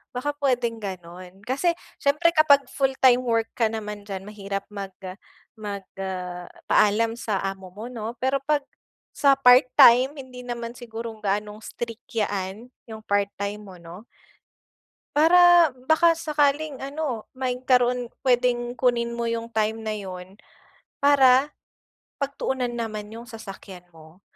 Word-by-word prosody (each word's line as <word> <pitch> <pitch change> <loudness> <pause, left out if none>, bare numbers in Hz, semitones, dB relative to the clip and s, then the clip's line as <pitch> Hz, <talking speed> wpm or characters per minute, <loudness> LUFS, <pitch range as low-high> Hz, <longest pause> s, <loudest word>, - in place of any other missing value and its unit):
baka 290 +4 -2
puwedeng 245 -5 -1
gano'n. 185 0 -9
Kasi, 275 +8 +1 0.3
siyempre 300 +4 +3
kapag 285 -3 +5
full 270 +1 -1
time 255 -1 +5
work 230 -2 +1
ka 225 -2 +1
naman 210 -2 -6
diyan, 195 -2 -7
mahirap 200 -1 -5
mag 200 -1 -5 0.6
mag 205 -3 -7 0.8
paalam 225 +2 +3
sa 220 -4 -2
amo 190 -1 -5
mo 205 +5 -9
'no. 235 -1 -6
Pero, 265 +1 0
'pag 290 0 0 0.5
sa 280 -1 +4
part 250 0 +7
time, 255 +4 +7
hindi 255 -2 -9
naman 235 -1 -5
sigurong 230 -2 -8
gaanong 210 +1 -2
strict 235 0 -7
'yan, 205 +2 -3 0.2
yung 220 -1 -8
part 200 0 +1
time 200 +1 -4
mo 190 -3 -12
'no. 170 +4 -12 1.1
Para 345 0 +6 0.2
baka 330 +1 +5
sakaling 295 -2 0
ano, 275 -5 -4
magkaroon 250 -1 +1
puwedeng 245 -1 +1
kunin 235 -1 +1
mo 235 0 -2
yung 230 0 -3
time 220 0 0
na 220 -1 -3
'yon, 185 -1 -8 0.7
para 280 0 +5 0.7
pagtuunan 265 -3 -2
naman 215 -3 -5
yung 230 +2 -10
sasakyan 195 -5 -10
mo. 160 +4 -17
235 Hz, 135 wpm, -24 LUFS, 205-265 Hz, 1.1 s, part